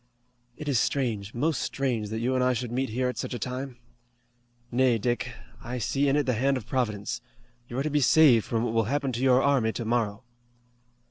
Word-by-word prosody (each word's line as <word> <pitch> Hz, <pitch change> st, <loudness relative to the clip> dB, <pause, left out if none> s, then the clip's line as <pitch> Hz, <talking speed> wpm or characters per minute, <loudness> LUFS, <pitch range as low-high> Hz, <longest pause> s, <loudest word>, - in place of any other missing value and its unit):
"It 150 Hz, -, -7 dB
is 135 Hz, -5 st, +2 dB
strange, 115 Hz, -7 st, -1 dB
most 150 Hz, +3 st, 0 dB
strange, 120 Hz, -6 st, -2 dB
that 110 Hz, -, -3 dB
you 125 Hz, +2 st, 0 dB
and 130 Hz, -1 st, +2 dB
I 130 Hz, 0 st, +3 dB
should 120 Hz, -1 st, -3 dB
meet 130 Hz, +2 st, -1 dB
here 125 Hz, +3 st, -1 dB
at 125 Hz, -, -3 dB
such -, -, -3 dB
a -, -, -2 dB
time. 125 Hz, +2 st, -5 dB, 0.9 s
Nay, 125 Hz, -1 st, +3 dB
Dick, 120 Hz, +2 st, -1 dB, 0.3 s
I 125 Hz, +1 st, -4 dB
see 135 Hz, +4 st, 0 dB
in 135 Hz, -, +2 dB
it 145 Hz, -1 st, +2 dB
the 125 Hz, -, +1 dB
hand 135 Hz, +4 st, +1 dB
of 120 Hz, -, -7 dB
Providence. 105 Hz, -, -2 dB, 0.5 s
You're 130 Hz, +3 st, -3 dB
to 155 Hz, -, -1 dB
be 150 Hz, 0 st, +2 dB
saved 130 Hz, -4 st, +6 dB
from 115 Hz, -1 st, -1 dB
what 120 Hz, -2 st, -1 dB
will 115 Hz, -1 st, +2 dB
happen 140 Hz, +2 st, -1 dB
to 120 Hz, 0 st, -3 dB
your 130 Hz, 0 st, +4 dB
army 135 Hz, -6 st, +2 dB
tomorrow." 115 Hz, -1 st, -1 dB
125 Hz, 205 wpm, -27 LUFS, 115-135 Hz, 0.9 s, saved